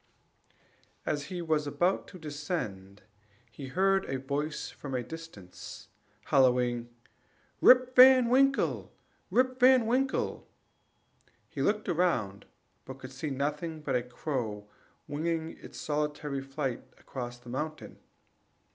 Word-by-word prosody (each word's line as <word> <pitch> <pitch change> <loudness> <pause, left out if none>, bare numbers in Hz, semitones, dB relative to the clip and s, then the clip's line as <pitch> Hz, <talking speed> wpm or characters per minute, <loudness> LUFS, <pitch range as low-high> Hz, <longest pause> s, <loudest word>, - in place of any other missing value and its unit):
As 145 -1 -1
he 175 +3 -5
was 155 -2 0
about 175 +7 0
to 185 - -11
descend, 145 - -5 0.5
he 135 +3 -8
heard 190 +6 +2
a 135 - -2
voice 145 +3 -3
from 135 -2 -6
a 125 - -1
distance, 160 - -10 0.4
hallooing, 125 -3 +2 0.7
"Rip 255 0 +6
Van 255 -1 +8
Winkle! 270 +2 +2 0.4
Rip 255 0 +2
Van 255 -2 +6
Winkle!" 260 +3 0 1.0
He - - -5
looked 210 +1 +1
round, 160 - 0 0.4
but 130 0 -9
could 130 -1 -10
see 135 +3 -4
nothing 150 +4 -3
but 140 -3 -1
a 125 - +2
crow 120 -5 -4 0.4
winging 160 +2 -2
its - - -11
solitary 150 -2 -2
flight 135 -2 -3 0.2
across 120 -2 -7
the 120 0 -14
mountain. 155 +5 -5
150 Hz, 120 wpm, -30 LUFS, 130-180 Hz, 1.0 s, Van